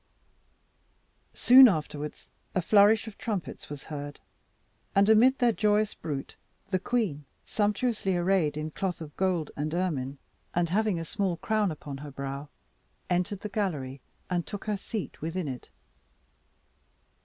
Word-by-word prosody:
Soon 255 +1 +9
afterwards 150 -5 -3 0.3
a 185 - +3
flourish 210 +4 +5
of 215 - -10
trumpets 205 -6 -4
was 145 -1 -7
heard, 145 -1 -7 0.8
and 200 +1 +5
amid 235 +5 +6
their 245 -1 +4
joyous 210 0 +2
bruit 140 -4 -5 0.4
the 185 - +2
queen, 185 -11 -1 0.2
sumptuously 210 -2 0
arrayed 175 -4 +2
in 155 +1 -3
cloth 185 +1 -2
of 155 -3 -9
gold 180 -5 0
and 155 +3 -2
ermine, 145 -7 -1 0.4
and 175 -1 +2
having 205 -1 +1
a 165 - -4
small 185 +1 -1
crown 215 +2 +1
upon 145 -2 -7
her 150 +1 -7
brow, 140 +1 -5 0.6
entered 180 +2 0
the - - -3
gallery, 150 -11 -2 0.3
and 175 -2 -1
took 205 - -6
her 210 -1 0
seat 200 +1 -5
within 165 +1 -2
it. 130 -2 -6
180 Hz, 140 wpm, -28 LUFS, 150-210 Hz, 0.8 s, Soon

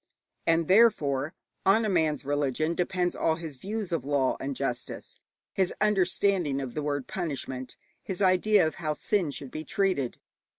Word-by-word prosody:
And 165 -1 +3
therefore 160 - +3 0.3
on 220 +4 +4
a - - +1
man's 155 -6 +1
religion 145 +2 0
depends 180 0 0
all 160 - +1
his 160 -4 -7
views 205 - -4
of 165 -6 -1
law 140 -2 +1
and 135 0 -3
justice, 125 -3 -4 0.3
his 190 -2 +1
understanding 190 -6 +2
of 130 -3 -5
the 150 - -2
word 145 -2 -2
'punishment,' 135 -7 -4 0.2
his 190 -1 -5
idea 195 0 +4
of 155 - -1
how 155 -2 -1
sin 190 -1 0
should 140 -2 -7
be 155 - -5
treated. 185 -10 0
160 Hz, 160 wpm, -28 LUFS, 140-190 Hz, 0.3 s, on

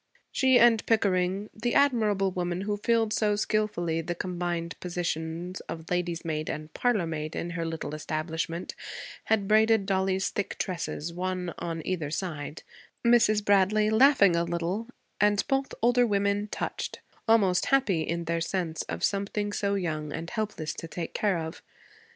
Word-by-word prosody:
She 260 -2 +4
and 235 -3 +5
Pickering, 195 -2 +1
the 240 +2 -2
admirable 215 -9 +3
woman 180 0 -2
who 205 +1 -1
filled 225 0 +1
so 210 -1 +2
skillfully 205 -6 0
the 175 +1 -3
combined 175 -1 -3
positions 175 0 -3
of 160 +1 -7
lady's 175 -1 -1
maid 155 -1 -2
and 155 +1 -5
parlormaid 165 -10 -1
in 170 - -3
her 170 -1 -3
little 160 -2 -4
establishment, 160 +2 -3 0.5
had 205 -3 +1
braided 220 -1 +4
Dollie's 190 -1 +1
thick 205 - -3
tresses, 170 -2 -3
one 180 0 -3
on 165 -2 -4
either 165 -6 -2
side 155 -2 -4 0.4
Mrs. 215 -3 +4
Bradley 205 +2 +4
laughing 220 -6 +6
a 170 - +2
little 170 +6 -2 0.3
and 205 0 +3
both 270 0 0
older 245 +1 +4
women 200 0 +1
touched, - - -4 0.3
almost 200 -6 +4
happy 250 -12 +3
in 170 +2 -2
their 165 0 -1
sense 165 -2 -2
of 85 +1 -4
something 205 +1 0
so 200 -1 0
young 155 -5 -2
and 165 +3 -5
helpless 210 -9 -3
to 165 - -7
take 165 0 -5
care 200 -4 +1
of. 160 +1 -5
185 Hz, 150 wpm, -28 LUFS, 165-210 Hz, 0.5 s, laughing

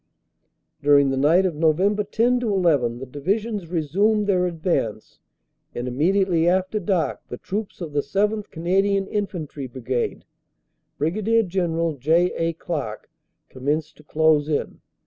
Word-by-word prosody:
"During 140 -1 +5
the - - 0
night 160 +8 +4
of 180 - 0
Nov. 155 0 +2
10 210 +5 +1
11 170 - +1
the 130 - -7
Divisions 195 - -2
resumed 190 +7 +1
their 185 -3 +2
advance, 160 - -2 0.6
and 120 +1 -3
immediately 170 +5 +2
after 185 +3 0
dark 180 -4 -1
the - - -6
troops 200 -1 -5
of 160 -4 -6
the 145 - +1
7th. 205 +9 -1
Canadian 195 +4 +1
Infantry 180 -10 -4
Brigade 125 0 -3 0.7
(Brig. 215 +7 +1
General 165 -4 -1
J. 165 +7 +2
A. 165 0 -1
Clark) 145 -10 -5 0.4
commenced 145 +4 -3
to 150 - -17
close 155 0 +2
in. 150 - -2
170 Hz, 130 wpm, -23 LUFS, 145-195 Hz, 0.7 s, During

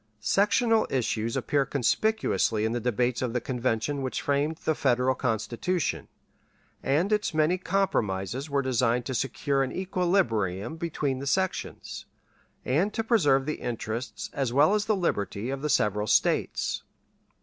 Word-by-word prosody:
Sectional 215 - +2
issues 115 -3 -1
appear 145 -1 +1
conspicuously 135 - +1
in 110 - 0
the 120 - -1
debates 120 +1 0
of 125 -3 -1
the 125 - +1
Convention 130 +2 -1
which 130 -1 -2
framed 145 +3 +1
the 160 - +3
Federal 130 -2 +2
Constitution, 120 - -1 0.7
and 165 +10 +1
its 210 -5 0
many 160 +4 +2
compromises 130 - -1
were 140 -1 +1
designed 125 -1 +1
to 130 - -3
secure 135 +2 0
an 130 -1 -1
equilibrium 160 - 0
between 150 -5 -2
the 140 - -5
sections, 190 +6 -2 0.6
and 165 +11 +1
to 225 - 0
preserve 145 - +3
the 155 - -2
interests 115 0 -4
as 135 -4 -1
well 145 +9 +4
as 210 -1 +1
the 215 -1 +2
liberties 115 - -1
of 135 - -5
the 150 - -2
several 105 -4 +1
States. - - +1
135 Hz, 145 wpm, -27 LUFS, 120-170 Hz, 0.7 s, well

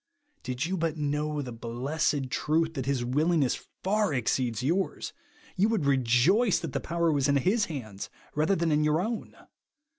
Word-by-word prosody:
Did 130 +3 -3
you 190 +3 -1
but 165 -2 -1
know 150 0 -1
the 125 - -6
blessed 130 +4 -2
truth, 160 +7 +1
that 135 -4 -4
his 135 -3 0
willingness 150 +2 +1 0.2
far 205 -4 +1
exceeds 125 -1 0
yours, 175 +8 -1 0.4
you 200 +3 +3
v/ould 215 -10 0
rejoice 140 - +3
that 165 -5 -5
the - - 0
power 170 0 0
was 140 -2 +2
in 140 - +3
his 200 - +2
hands 110 -11 -6 0.2
rather 155 +6 +2
than 170 -2 0
in 150 0 +3
your 150 +1 +2
own. 220 +5 -4
150 Hz, 170 wpm, -28 LUFS, 130-170 Hz, 0.4 s, you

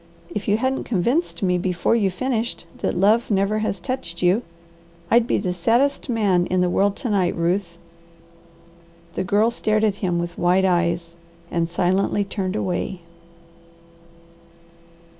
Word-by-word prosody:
If 205 - -4
you 205 0 +3
hadn't 260 +3 -1
convinced 240 - 0
me 180 -1 +2
before 180 +4 +1
you 205 -4 +2
finished 230 0 -2
that - - -2
love 210 +5 +3
never 200 +1 +1
has 215 -3 -2
touched 175 -5 -5
you, 180 +6 +3 0.7
I'd 235 0 +5
be - - +2
the 185 -3 -1
saddest 240 +11 +1
man 200 -7 +2
in 185 0 +1
the 180 -1 +1
world 200 +2 +2
to 245 - -4
night, 185 -4 +1
Ruth." 170 +1 -1 1.4
The 185 - -2
Girl 210 +5 +2
stared 215 -2 0
at 205 -2 +1
him 175 -3 0
with 170 0 -4
wide 180 +2 +3
eyes 170 -2 0 0.4
and 170 -1 0
silently 185 +4 +1
turned 195 -1 -3
away. 185 -2 -2
195 Hz, 145 wpm, -22 LUFS, 175-220 Hz, 1.4 s, I'd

